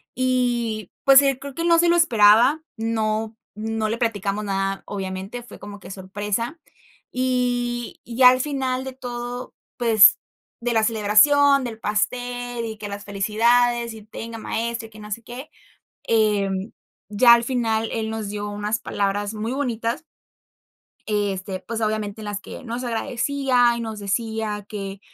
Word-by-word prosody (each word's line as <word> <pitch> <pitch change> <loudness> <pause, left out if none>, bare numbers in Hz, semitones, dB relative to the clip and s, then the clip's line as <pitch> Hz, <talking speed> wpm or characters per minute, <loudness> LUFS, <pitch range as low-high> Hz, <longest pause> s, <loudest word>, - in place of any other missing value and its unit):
Y, 240 -5 0
pues, 275 0 +8
eh, 275 -2 +1
creo 280 0 -8
que 335 - -3
no 335 -1 +5
se 345 0 +4
lo 340 - +4
esperaba, 240 -1 +5 0.2
no 220 0 -1 0.2
no 220 0 -2
le 225 - -1
platicamos 210 -3 -1
nada, 195 0 -2
obviamente, 195 +4 -5
fue - - -13
como 205 -1 -10
que - - -10
sorpresa. 205 - -3 0.5
Y 245 -2 -1
y 235 - -8
ya 255 -1 +9
al 255 0 +2
final 260 -2 -2
de 265 - -6
todo, 245 0 -6 0.2
pues, 225 -4 +6 0.4
de 240 +1 -1
la 220 -1 +3
celebración, 260 +6 +4
del 225 -2 -5
pastel 245 +3 -2
y 220 -1 -6
que 210 -1 -6
las 200 0 -6
felicidades, 235 +4 +2
y 220 - -11
tenga 225 +1 -7
maestro 230 +1 -3
y - - -20
que 215 - -13
no 210 0 -10
sé 230 +3 -4
qué, 250 +6 -9 0.5
em, 205 -2 +1 0.4
ya 235 +3 +7
al 235 0 +4
final, 225 -3 0
él 220 -1 -2
nos 220 -2 -4
dio 205 0 -4
unas 210 +1 -2
palabras 205 +1 -2
muy 220 +3 -3
bonitas. 240 -2 -2 1.1
Eh, 205 -1 +1
este, 190 0 -5
pues, 230 0 -5
obviamente 215 -1 -2
en 215 - -7
las 205 -1 -3
que - - -10
nos 240 +1 -4
agradecía, 245 +1 +1
y - - -4
nos 220 -2 -5
decía 210 0 -2
que 195 -2 -6
225 Hz, 160 wpm, -23 LUFS, 210-245 Hz, 1.1 s, ya